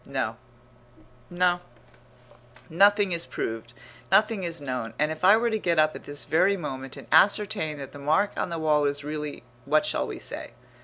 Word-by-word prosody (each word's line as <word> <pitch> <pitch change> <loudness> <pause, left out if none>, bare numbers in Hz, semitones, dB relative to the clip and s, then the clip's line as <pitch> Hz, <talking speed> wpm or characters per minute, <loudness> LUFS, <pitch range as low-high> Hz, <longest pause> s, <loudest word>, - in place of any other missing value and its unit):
No, 130 -5 -3 0.9
no, 175 0 +2 1.1
nothing 200 +3 +4
is 170 -1 -2
proved, 115 +1 -5 0.4
nothing 215 -1 +3
is 170 -2 -3
known. 125 -5 -4
And 150 +1 +1
if 160 - -7
I 200 +4 +7
were 235 0 0
to 220 - 0
get 170 -4 0
up 155 0 +3
at - - -10
this 145 0 -3
very 195 +5 +3
moment 135 -5 -6
and - - -10
ascertain 160 -3 +3
that 140 -2 -8
the 145 - -11
mark 160 +9 +2
on - - -2
the 170 - -3
wall 150 -2 +2
is 145 0 -1
really 150 -3 -5 0.2
what 155 +2 +2
shall - - -1
we - - -6
say? - - -8
155 Hz, 185 wpm, -26 LUFS, 145-185 Hz, 1.1 s, I